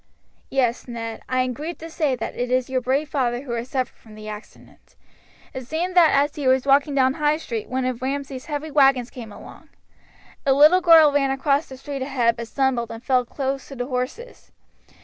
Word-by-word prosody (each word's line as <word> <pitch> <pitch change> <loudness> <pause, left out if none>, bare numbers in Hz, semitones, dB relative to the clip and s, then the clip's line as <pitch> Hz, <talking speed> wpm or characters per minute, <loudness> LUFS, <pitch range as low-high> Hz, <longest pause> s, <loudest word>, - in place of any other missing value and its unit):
"Yes, 250 -3 0
Ned, 230 -2 -6
I 255 0 +1
am 255 0 -1
grieved 310 +7 -6
to 330 - -7
say 300 -5 0
that - - -5
it 245 0 -2
is 255 +1 0
your 260 -1 0
brave 270 +5 0
father 250 -4 -1
who 270 -3 -8
has 235 +1 -4
suffered 255 -2 -2
from 220 -2 -16
the 215 0 -10
accident. 210 +1 -12 0.6
It 260 -2 -7
seems 340 +5 -2
that 345 -3 +6
as 285 +1 +2
he 285 -3 -3
was 260 0 +3
walking 280 +1 +3
down 260 -1 +4
the 270 - -8
High 300 0 +2
Street 230 -9 -5
one 255 0 -1
of 255 -2 -3
Ramsay's 270 0 -4
heavy 300 0 -5
wagons 270 -4 +3
came 230 -4 -9
along. - - -13 0.7
A 275 - +3
little 305 +7 +6
girl 325 -4 +7
ran 280 -1 +1
across 275 +3 0
the 265 - -10
street 275 +1 -6
ahead, 250 -4 +1
but 235 -1 -6
stumbled 255 -3 0
and 230 +1 -9
fell 255 -2 +2
close 270 +1 -4
to 275 - -9
the 245 -1 -3
horses. 260 - -5
265 Hz, 210 wpm, -23 LUFS, 245-290 Hz, 0.7 s, girl